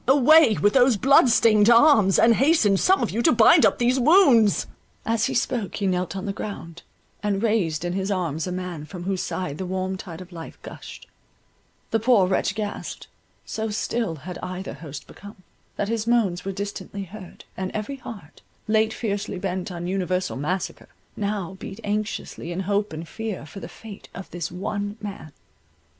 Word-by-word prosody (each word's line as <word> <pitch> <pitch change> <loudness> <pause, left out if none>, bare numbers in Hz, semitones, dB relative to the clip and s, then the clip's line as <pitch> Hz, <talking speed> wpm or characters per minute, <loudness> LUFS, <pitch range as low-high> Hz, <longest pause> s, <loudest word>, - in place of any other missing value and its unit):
Away 280 0 +6
with 205 +1 +2
those 250 -3 +5
blood 265 +2 +5
stained 220 -2 +5
arms, 230 -6 +6
and 230 0 +6
hasten 265 -6 +3
some 375 - +3
of - - -1
you 230 - -1
to - - +4
bind 245 +7 +6
up - - -1
these 250 +2 +2
wounds." 255 - +5 0.4
As 225 -1 +1
he - - -2
spoke, 235 -4 -1
he 205 - -2
knelt 185 0 -1
on 190 - -4
the 200 - -2
ground, 170 -5 -7 0.4
and 205 0 -1
raised 175 -8 0
in 175 - -2
his 190 +1 -2
arms 170 -4 -2
a - - -3
man 180 -4 -5
from 175 +2 -8
whose 190 0 -1
side 155 -6 -4
the 190 - -3
warm 190 +1 -2
tide 175 -3 -9
of 185 0 -11
life 165 -2 -9
gushed—the 225 - -9
poor 225 -4 +4
wretch 185 - 0
gasped—so 220 +1 -6
still 215 -3 -2
had 175 +5 -8
either 185 +1 -6
host 145 -3 -9
become, 200 -2 -13 0.3
that 205 - -2
his 225 0 -2
moans 205 -7 +1
were 195 - -3
distinctly 200 0 -5
heard, 190 -1 -11
and 185 0 -3
every 215 +6 -4
heart, 200 - -11 0.3
late 220 0 +2
fiercely 200 -3 -3
bent 185 0 -3
on 175 -1 -5
universal 185 0 -1
massacre, 175 +7 -4 0.3
now 200 -3 -3
beat 195 +3 -8
anxiously 205 -4 -3
in 175 +2 -3
hope 205 +2 -1
and 160 +1 -7
fear 215 -3 -5
for 160 +5 -10
the - - -8
fate 215 -3 -12
of 195 - -9
this 175 -1 -4
one 205 +3 -4
man. 200 -7 -8
200 Hz, 180 wpm, -24 LUFS, 180-225 Hz, 0.4 s, Away